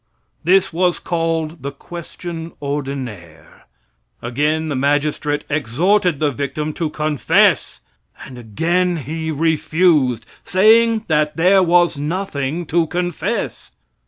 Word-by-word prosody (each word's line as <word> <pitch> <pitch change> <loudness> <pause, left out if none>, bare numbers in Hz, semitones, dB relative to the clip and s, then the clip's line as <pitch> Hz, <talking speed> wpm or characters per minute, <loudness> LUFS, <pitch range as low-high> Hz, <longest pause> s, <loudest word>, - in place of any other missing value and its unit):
This 185 0 +3
was 180 +1 +1
called 165 -2 -2
the 140 - -4
question 170 +2 -8
ordinaire. 130 - -6 0.5
Again 150 +6 -1
the 145 - -2
magistrate 145 +2 0
exhorted 155 - +1
the 150 -2 +1
victim 140 +4 -3
to 160 0 -2
confess, 150 -1 +1 0.4
and 130 - -11
again 170 - 0
he 160 +3 -4
refused, 155 -5 +1 0.2
saying 220 +3 +4
that 150 -1 +1
there 185 +4 +5
was 175 -3 +3
nothing 160 -1 -3
to 165 +1 +1
confess. 175 - -3
155 Hz, 105 wpm, -19 LUFS, 140-175 Hz, 0.5 s, there